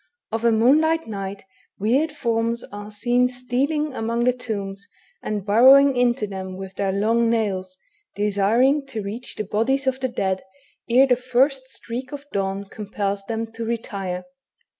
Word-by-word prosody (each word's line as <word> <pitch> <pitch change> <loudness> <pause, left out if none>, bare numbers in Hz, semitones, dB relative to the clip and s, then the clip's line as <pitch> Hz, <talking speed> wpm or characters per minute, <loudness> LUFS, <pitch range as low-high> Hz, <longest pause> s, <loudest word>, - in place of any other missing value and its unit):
Of 225 +1 -2
a 235 - +5
moonlight 310 +9 +3
night 195 -2 -6 0.3
weird 260 +10 +1
forms 235 -4 -1
are 205 +1 -7
seen 245 +4 +2
stealing 260 +4 -1
among 230 0 -1
the 250 +1 +3
tombs, 200 -5 -5 0.3
and 210 -2 -3
burrowing 265 +6 +7
into 245 -2 +2
them 190 -2 -6
with 190 0 -7
their 195 0 -1
long 225 +4 +2
nails, 190 -5 -1 0.4
desiring 220 +8 +2
to 225 -6 -5
reach 225 +5 -6
the - - -3
bodies 230 +7 0
of 265 0 0
the 260 - 0
dead 190 -5 -1 0.5
ere 255 +3 +6
the 255 -2 +3
first 260 +2 +1
streak 255 0 -6
of 290 -1 -7
dawn 195 0 -1
compels 200 -1 -4
them 225 +1 -2
to 230 +1 -6
retire. 200 -5 -3
230 Hz, 155 wpm, -23 LUFS, 200-255 Hz, 0.5 s, burrowing